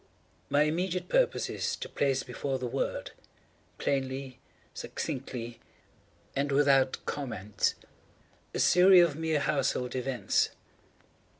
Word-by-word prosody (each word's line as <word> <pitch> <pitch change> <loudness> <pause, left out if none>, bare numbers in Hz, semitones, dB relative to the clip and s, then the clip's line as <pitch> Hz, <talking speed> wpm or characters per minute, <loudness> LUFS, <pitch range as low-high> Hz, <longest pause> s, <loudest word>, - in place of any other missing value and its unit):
My 145 +1 +4
immediate 180 +3 -1
purpose - - +2
is - - -2
to - - -6
place 135 -2 0
before 135 -2 -3
the 130 - -4
world, 120 - -2 0.7
plainly, 130 -1 -2 0.3
succinctly, 120 -3 -5 0.8
and 140 +1 0
without 135 -2 +4
comment, 110 -8 -2 0.8
a - - -5
series 180 0 +7
of 155 -4 -3
mere 160 -1 0
household 135 -3 0
events. 130 0 +1
140 Hz, 105 wpm, -29 LUFS, 130-155 Hz, 0.8 s, series